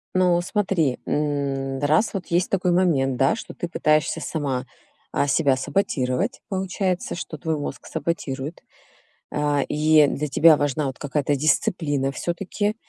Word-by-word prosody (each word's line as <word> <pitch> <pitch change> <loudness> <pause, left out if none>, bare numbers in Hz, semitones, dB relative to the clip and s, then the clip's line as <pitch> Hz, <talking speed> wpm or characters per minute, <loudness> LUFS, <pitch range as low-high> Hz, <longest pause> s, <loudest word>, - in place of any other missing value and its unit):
Ну, 180 -2 +3
смотри, 180 - 0
м, 140 -2 -1
раз 155 +10 +2
вот 195 -3 -4
есть 175 +2 +1
такой 185 -2 +1
момент, 150 -8 +2
да, 135 - +3
что 225 - -8
ты 175 - -4
пытаешься 155 -3 +1
сама, 140 -5 -2 0.5
а, 145 - +1
себя 140 -1 +3
саботировать, 145 - -1
получается, 190 -2 -2
что 165 -2 -6
твой 160 +1 -2
мозг 145 - -6
саботирует, 150 -2 -4 0.7
а, 145 -1 +1
и 155 0 +4
для 150 +2 -2
тебя 155 +3 +6
важна 145 +1 0
вот 130 - -6
какая-то 145 0 0
дисциплина 145 -1 +1
всё-таки. 195 +7 -2
155 Hz, 140 wpm, -23 LUFS, 140-175 Hz, 0.7 s, тебя